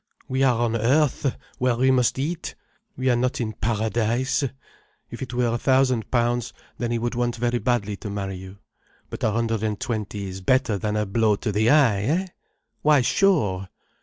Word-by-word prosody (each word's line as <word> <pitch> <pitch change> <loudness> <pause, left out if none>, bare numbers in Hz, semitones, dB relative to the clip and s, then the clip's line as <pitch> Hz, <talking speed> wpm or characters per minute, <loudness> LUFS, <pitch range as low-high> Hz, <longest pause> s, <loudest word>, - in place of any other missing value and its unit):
We 130 +1 -1
are 130 -3 +4
on 115 -1 +1
earth, 135 +3 +2 0.2
where 125 -1 +2
we 130 +2 +3
must 125 -1 +2
eat. 160 +5 -3 0.4
We 130 - -1
are - - +3
not 125 +2 0
in 110 -3 -2
Paradise. 115 +5 0 0.7
If 120 - -8
it 130 - -5
were 120 -2 +1
a 120 - -1
thousand 130 -3 +2
pounds, 120 -1 0 0.3
then 120 - -1
he 120 - 0
would 120 +1 -2
want 120 0 -1
very 120 +1 0
badly 105 -5 -1
to 105 - -7
marry 95 -2 -4
you. 95 +1 -10 0.5
But - - -6
a - - +3
hundred 115 0 -1
and 105 -2 -2
twenty 105 -3 -3
is 95 0 -7
better 115 0 +2
than 105 0 -2
a 105 0 0
blow 105 +1 +2
to 105 +2 -3
the 110 +3 +2
eye, 125 -9 +4
eh? 160 - 0 0.6
Why 150 -2 +5
sure!" 105 - +2
120 Hz, 190 wpm, -24 LUFS, 105-130 Hz, 0.7 s, Why